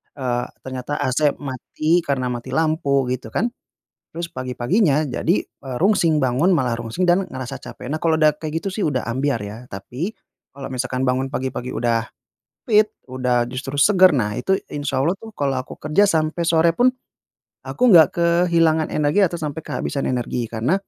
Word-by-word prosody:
eee, 125 -3 -2 0.2
ternyata 130 +2 -4
AC 140 +3 +2
mati 150 +5 -1
karena 130 -5 -1
mati 125 +2 -5
lampu, 155 -4 +1
gitu 130 0 -4
kan. 235 +1 -1 0.6
Terus 170 0 -4
pagi-paginya 135 - +1
jadi, 170 +8 +1
e 135 - -16
rungsing, 165 -7 +3
bangun 135 +9 +3
malah 125 -6 0
rungsing 120 +10 -4
dan 180 +1 +3
ngerasa 130 +1 -6
capek. 125 +1 -9
Nah, 155 - -1
kalau 165 -1 +2
udah 155 -1 +5
kayak 160 +1 -4
gitu 195 - -2
sih 200 -1 -1
udah 130 -4 0
ambyar 130 -2 -1
ya. 105 +2 -7
Tapi 125 - -5 0.4
kalau 135 -1 -7
misalkan 130 +1 -2
bangun 130 +1 0
pagi-pagi 130 -2 -3
udah 115 -1 0 0.6
fit, 215 -1 +4 0.2
udah 125 -2 +1
justru 135 +2 -5
seger, 185 +3 +6
nah 105 -4 0
itu 190 0 +1 0.2
insya 145 -2 -2
Allah 165 +6 +2
tuh 225 - -10
kalau 140 -2 0
aku - - -10
kerja 200 +7 +3
sampai 160 +1 0
sore 165 0 +4
pun 245 +6 +4 0.8
aku 250 - -6
nggak 160 -6 +8
kehilangan 170 -2 +3
energi 150 +6 +2
atau 170 - -4
sampai 155 0 -4
kehabisan 140 - -3
energi. 120 -1 -2
Karena 115 +9 0
145 Hz, 170 wpm, -21 LUFS, 130-170 Hz, 0.8 s, nggak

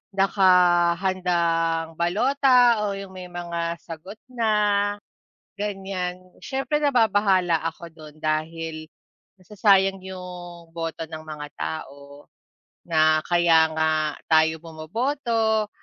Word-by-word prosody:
nakahandang 175 -3 +2
balota 245 +4 +3
o 205 - -1
yung 195 -1 -9
may 180 -1 -9
mga 170 -1 -4
sagot 180 +6 -10
na, 230 -3 0 1.1
ganyan. 190 -3 -5
Siyempre 270 +3 -1
nababahala 205 - +3
ako 165 +1 -6
don 155 -2 -14
dahil 155 +1 -3 0.6
sayang 195 0 +3
yung 180 -2 -9
boto 165 -1 -4
ng 160 0 -8
mga 150 -1 -7
tao, 140 -2 -7 0.6
na 155 -2 +3
kaya 170 -2 +4
nga 160 0 +2 0.4
tayo 160 0 +3
bumoboto 220 - -1
175 Hz, 95 wpm, -24 LUFS, 165-200 Hz, 1.1 s, kaya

